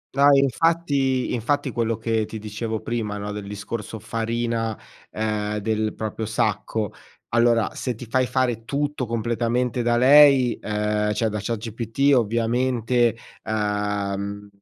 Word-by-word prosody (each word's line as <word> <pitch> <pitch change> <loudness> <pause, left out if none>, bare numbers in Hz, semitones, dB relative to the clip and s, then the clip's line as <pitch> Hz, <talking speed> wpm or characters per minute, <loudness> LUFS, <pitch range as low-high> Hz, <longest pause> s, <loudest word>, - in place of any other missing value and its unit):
No, 140 +1 +5
infatti, 140 -1 +1
infatti, 135 +4 0
quello 115 -1 -1
che 110 -1 0
ti 110 - -7
dicevo 110 +1 -4
prima, 110 -3 -3
no, 105 0 -5
del 105 -1 -6
discorso 105 +2 -6
farina, 115 0 -2 0.3
ehm, 105 -1 -2
del 110 +1 -1
proprio 110 0 -4
sacco: 105 -1 -1 0.4
allora, 120 -1 +3
se 125 -2 -3
ti 125 - -9
fai 130 +2 +1
fare 120 -4 0
tutto 145 +1 -2
completamente 115 +2 -1
da 120 0 +2
lei, 135 -1 +6
ehm, 105 0 0
cioè 110 +1 0
da 105 0 -3
ChatGPT 115 +5 0
ovviamente, 120 0 +1 0.3
uhm, 105 -1 -2
115 Hz, 125 wpm, -23 LUFS, 105-125 Hz, 0.4 s, lei